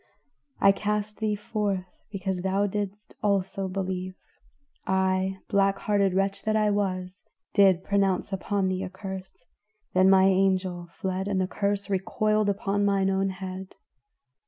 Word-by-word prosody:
I 195 - +7
cast 210 +1 -2
thee 215 -1 0
forth 205 -3 -2 0.3
because 190 -2 -3
thou 195 +2 +1
didst 205 0 -4
also 195 -2 0
believe, 185 -1 -3 0.7
I, 190 0 +1
black 195 -1 +2
hearted 200 -3 +1
wretch 195 +1 0
that 215 0 0
I 215 -1 +3
was, 185 -2 -2 0.3
did 190 -3 +5
pronounce 195 -1 +1
upon 195 +1 0
thee 185 0 -1
a 190 - -4
curse, 190 -2 -8 0.5
then 185 +1 +5
my 190 -1 +6
angel 185 -2 +1
fled 190 +2 -3
and 195 -2 0
the 185 - +2
curse 200 +1 -1
recoiled 215 +2 +1
upon 200 0 0
mine 195 -1 +2
own 195 0 +1
head. 190 0 -7
195 Hz, 140 wpm, -27 LUFS, 185-205 Hz, 0.7 s, I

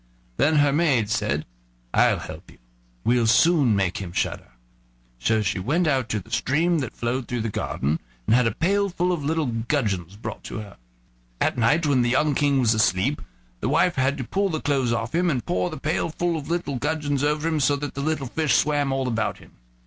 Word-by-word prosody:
Then 155 +2 +3
her 145 -1 +4
maid 135 -9 +2
said: 75 - 0 0.5
"I'll - - +4
help - - -9
you; - - -17 0.5
we'll 120 -1 +3
soon 140 -1 +4
make 95 -3 0
him 95 -3 -6
shudder." 60 - -3 0.7
So 110 - +1
she 100 - -1
went 150 - +1
out 135 -6 +1
to 110 - -1
the 110 +3 -14
stream 160 +8 +1
that 130 -5 -5
flowed 120 +1 -2
through 120 -1 -2
the 110 - -2
garden, 75 -4 -2 0.3
and 115 - +4
had 125 -2 +4
a 115 - -2
pail 200 +4 +1
full 180 0 0
of 170 -5 -2
little 160 +2 0
gudgeons 110 - -2
brought 110 0 -7
to - - -6
her. 105 -2 -9 0.6
At - - +1
night, 140 +8 +2
when 140 -4 +3
the 120 - +1
young 145 +4 +2
King 140 0 +2
was 115 -3 +3
asleep, 110 +5 +1 0.4
his 115 - -1
wife 165 +5 +3
had 135 0 +1
to 130 - -3
pull 195 +10 0
the 160 -3 -2
clothes 135 -5 0
off 115 -1 -2
him, 175 +1 +2
and 130 -7 -1
pour 180 0 0
the 155 - -7
pail 155 +2 -1
full 170 +1 -1
of 155 -2 -5
little 165 -6 -2
gudgeons 145 0 -1
over 150 +2 0
him, 160 -2 0
so 145 +1 +3
that 145 0 -5
the 140 - -4
little 155 -1 -1
fish 140 -1 +1
swam 145 -1 +2
all 135 -1 -1
about 115 -3 -1
him. - - -17
135 Hz, 215 wpm, -24 LUFS, 115-155 Hz, 0.7 s, her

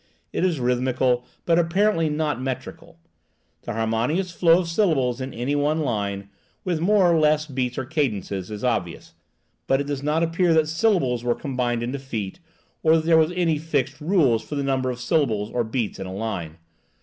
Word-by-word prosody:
It - - -1
is 175 -6 +1
rhythmical, 125 0 +1 0.2
but 170 0 +3
apparently 170 0 +2
not 150 -4 -1
metrical: 135 +6 -6 0.7
the - - -3
harmonious 115 - 0
flow 170 -1 +4
of 175 - -5
syllables 150 - +1
in 130 +1 -4
any 125 +5 -2
one 150 +2 +1
line, 100 -7 -2 0.4
with 175 -4 -1
more 190 -1 +4
or 165 - +3
less 155 0 +3
beats 130 -4 -3
or 130 - -2
cadences, 110 - -2
is 105 +1 -7
obvious; 100 -9 -2 0.5
but 135 - +3
it 140 - -2
does 145 -1 -3
not 150 +3 +1
appear 165 0 +2
that 160 -1 +3
syllables 160 - +1
were 120 -1 +1
combined 125 -4 -2
into 130 +4 -3
feet, 115 - -5 0.4
or 160 0 +5
that 160 -1 0
there 165 0 +5
was 160 +1 +4
any 165 -4 +1
fixed 150 -5 -2
rule 150 - +3
for 150 - -7
the 140 - -1
number 135 -1 0
of 125 -1 -4
syllables 115 -7 0
or 120 - 0
beats 110 0 -3
in 95 - -5
a 95 - -6
line. 90 -7 -4
140 Hz, 185 wpm, -23 LUFS, 120-160 Hz, 0.7 s, or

